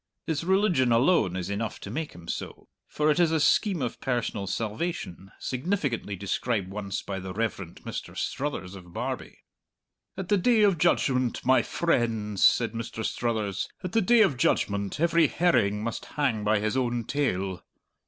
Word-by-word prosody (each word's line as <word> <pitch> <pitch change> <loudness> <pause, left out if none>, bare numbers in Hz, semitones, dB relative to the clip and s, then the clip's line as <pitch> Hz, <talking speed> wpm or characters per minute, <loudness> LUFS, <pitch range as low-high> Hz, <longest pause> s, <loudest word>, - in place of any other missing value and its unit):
His 160 -1 -1
religion 185 - +3
alone 115 - +3
is 90 -2 -3
enough 105 +2 -3
to 100 - -7
make 155 +5 -4
him 85 -1 -13
so; - - -6 0.2
for 150 0 +1
it 150 - +1
is 170 -2 +5
a 160 - +2
scheme 180 - +2
of 120 - -4
personal 115 -6 -2
salvation 105 - -4
significantly 130 - -2
described 100 +1 -2
once 100 -2 -4
by 95 -1 -4
the 95 0 -6
Reverend 100 -6 -3
Mr. - - -6
Struthers 135 -10 -3
of 90 -3 -12
Barbie. - - -5 0.7
"At 190 -2 -5
the 205 - +4
Day 225 +3 +4
of 195 -5 +3
Judgment, 130 -7 +1
my 130 +1 +5
frehnds," 115 - 0
said 115 -2 +4
Mr. 115 -1 -5
Struthers 110 -5 -1
"at 180 - -3
the 225 - +3
Day 235 +3 +5
of 170 -11 +1
Judgment 100 -2 0
every 170 -1 +4
herring 105 - +2
must 115 0 -4
hang 130 -8 -1
by 105 +1 +3
his 110 +3 -1
own 120 -2 0
tail!" 95 -9 -1
120 Hz, 165 wpm, -27 LUFS, 100-160 Hz, 0.7 s, is